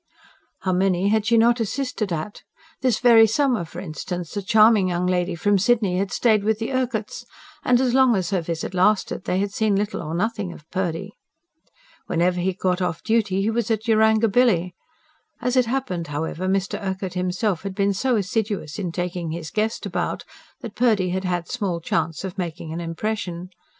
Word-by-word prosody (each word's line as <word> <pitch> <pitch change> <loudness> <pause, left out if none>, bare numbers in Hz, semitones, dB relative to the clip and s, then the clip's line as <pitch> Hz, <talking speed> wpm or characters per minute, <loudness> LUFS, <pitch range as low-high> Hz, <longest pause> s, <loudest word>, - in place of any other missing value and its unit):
How 185 - 0
many 185 +1 +2
had 215 0 +1
she 230 -1 +4
not 235 +2 +4
assisted 230 -2 -2
at! 165 +5 -4 0.4
This 255 -5 +2
very 230 -2 +6
summer, 245 -2 +1
for 165 - -9
instance, 175 +1 -6
a 205 - -1
charming 215 0 +5
young 175 0 -1
lady 180 -1 0
from 200 +4 +2
Sydney 200 -3 +2
had 195 0 -2
stayed 215 -4 +2
with 220 0 +1
the 225 +1 -3
Urquharts; 245 -4 -2 0.4
and, 245 -1 +4
as 255 -2 +1
long 260 -3 +5
as 185 -2 -1
her 190 -3 +1
visit 165 +2 -4
lasted, 185 0 +1
they 180 - 0
had 200 +1 -1
seen 215 -2 +1
little 205 +2 -1
or 155 +2 -4
nothing 210 -1 -1
of 150 - -15
Purdy. 185 +1 -2 1.0
Whenever 180 +2 +1
he 185 +2 +1
got 185 0 -1
off 175 -2 -2
duty 210 -4 +1
he 220 - +1
was 235 0 -1
at 220 0 -1
Yarangobilly. 220 -4 +3 0.7
As 250 +1 -1
it 250 -2 +3
happened, 235 -10 -2
however, 160 +5 -3
Mr. 195 0 -1
Urquhart 190 -2 -3
himself 180 +1 -1
had 195 -1 -5
been 200 0 +1
so 250 +6 +1
assiduous 200 -5 -2
in 180 -4 -3
taking 175 -1 -3
his 160 0 -5
guest 220 +1 -1
about - - -3 0.4
that 230 -4 -7
Purdy 215 -7 +2
had 190 +1 -2
had 175 -1 -1
small 180 -5 -2
chance 165 0 -2
of 190 0 -6
making 165 -2 -4
an 170 - -4
impression. 180 0 -4
195 Hz, 185 wpm, -23 LUFS, 180-220 Hz, 1.0 s, very